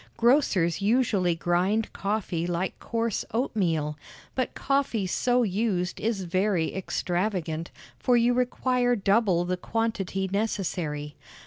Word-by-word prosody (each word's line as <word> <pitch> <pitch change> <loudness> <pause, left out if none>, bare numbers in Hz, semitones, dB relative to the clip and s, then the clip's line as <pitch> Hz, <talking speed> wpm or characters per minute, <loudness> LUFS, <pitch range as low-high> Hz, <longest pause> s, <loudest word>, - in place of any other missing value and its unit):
Grocers 225 - +3
usually 200 -5 +2
grind 180 +6 0
coffee 195 -5 -2
like 175 +1 -1
coarse 230 -2 -1
oatmeal; 165 - 0 0.3
but 255 -2 -2
coffee 275 -7 0
so 245 +6 +2
used 195 -3 -1
is 215 -3 -1
very 185 -1 0
extravagant, 175 -3 -2 0.3
for 245 -1 +3
you 240 +1 +4
require 250 0 +1
double 195 -4 +2
the 180 +1 -1
quantity 195 -2 -1
necessary. 175 -7 -2
195 Hz, 110 wpm, -27 LUFS, 175-230 Hz, 0.3 s, you